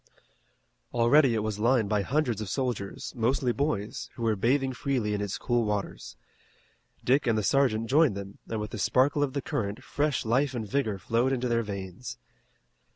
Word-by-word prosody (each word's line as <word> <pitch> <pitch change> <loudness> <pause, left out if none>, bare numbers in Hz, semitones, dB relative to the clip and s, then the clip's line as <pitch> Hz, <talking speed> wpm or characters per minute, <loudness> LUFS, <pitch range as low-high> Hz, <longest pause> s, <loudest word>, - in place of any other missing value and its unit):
Already 120 +2 +5
it 110 - 0
was 105 -1 -3
lined 115 -1 +3
by 105 0 +1
hundreds 125 -2 0
of 105 - -4
soldiers, 120 -4 -3
mostly 125 +2 +1
boys, 130 -6 -2
who 115 - -6
were 110 -1 +2
bathing 130 +6 +1
freely 125 -5 -1
in 105 - -1
its 100 -2 -3
cool 120 -1 +1
waters. 105 -2 -3 0.9
Dick 130 +2 +2
and 115 -2 +3
the 105 - 0
sergeant 115 -1 +2
joined 145 -2 +4
them 100 0 -8
and 110 - -2
with 105 +1 -4
the 110 - -5
sparkle 135 +8 +3
of 140 -2 0
the 140 - -2
current 100 -1 -3
fresh 145 -4 -1
life 130 +4 +1
and 110 -3 -3
vigor 110 -3 0
flowed 115 +7 +1
into 125 -1 0
their 115 -1 +2
veins. 100 - -6
115 Hz, 180 wpm, -28 LUFS, 105-130 Hz, 0.9 s, Already